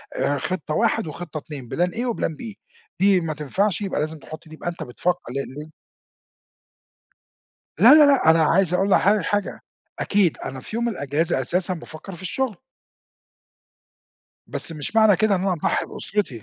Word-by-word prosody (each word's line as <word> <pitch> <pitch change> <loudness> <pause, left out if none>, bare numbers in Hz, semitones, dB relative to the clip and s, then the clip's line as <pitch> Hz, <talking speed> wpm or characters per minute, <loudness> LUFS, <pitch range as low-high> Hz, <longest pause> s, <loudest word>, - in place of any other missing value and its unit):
آآ 145 - 0
خطة 155 +1 -3
1 220 -4 +1
وخطة 155 0 -7
2 140 -5 -8
plan 175 +1 +2
A - - -1
و 240 - 0
plan - - -1
B 225 -3 -7 0.5
دي 195 -2 +4
ما 160 -1 -3
تنفعش، 185 +8 -1
يبقى 195 -6 -2
لازم 155 +1 -3
تحُط 155 +3 -11
دي، 155 - -13
يبقى 175 - -4
أنت 175 - -6
بتفكّر 175 +3 -2
لأن 140 0 -2
ل 150 +2 -8 2.1
لا، 235 - +9
لا، 305 -1 +8
لأ، 270 - +5
أنا 165 0 +5
عايز 175 +3 +3
أقول 195 +2 +1
لحضرتك 200 -1 +3
حاجة 205 -1 -2 0.4
أكيد، 195 -5 +2
أنا 130 0 -6
في 215 - -7
يوم 235 0 0
الإجازة 160 - -1
أساسًا 180 +7 0
بافكّر 165 +3 -10
في 170 - -12
الشغل. 225 +4 -2 1.9
بس - - -4
مش 155 +8 -5
معنى 220 -3 +6
كده 215 0 +2
إن 180 - 0
أنا 195 -1 +1
أضحّي 165 - -1
بأسرتي، 145 - -3
175 Hz, 170 wpm, -23 LUFS, 155-205 Hz, 2.1 s, لا